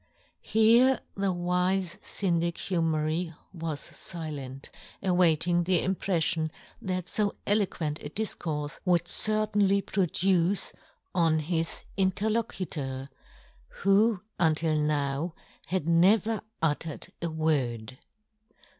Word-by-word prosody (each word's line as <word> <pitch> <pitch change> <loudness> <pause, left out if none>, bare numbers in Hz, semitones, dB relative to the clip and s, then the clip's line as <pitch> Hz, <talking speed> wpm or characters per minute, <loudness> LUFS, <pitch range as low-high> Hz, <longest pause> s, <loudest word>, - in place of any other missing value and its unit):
" - - -38
Here 235 +4 +5
the 195 -1 0
wife 180 +1 0
Syndic 170 -3 0
Humery 165 -1 -1 0.2
was 160 -4 -4
filent, 145 -6 -7 0.3
awaiting 175 -1 +3
the 180 -2 +3
im 190 - +1
preffion 165 -4 0 0.3
that 185 -1 -3
fo 210 -2 0
eloquent 180 -7 0
a 145 - -6
difcourfe 155 -7 -3
would 175 -2 +2
certainly 210 -1 +3
produce 185 0 +1 0.4
on 165 -2 +3
his 165 +1 -2
in 190 -1 +3
terlocutor, 180 -11 -2 0.7
who 200 +2 +4 0.2
until 160 -1 +2
now 150 +2 0 0.3
had 175 -1 -1
never 200 +6 +4 0.2
uttered 155 0 -1
a 170 - -1
word. 130 -7 -1
175 Hz, 100 wpm, -28 LUFS, 155-195 Hz, 0.7 s, Here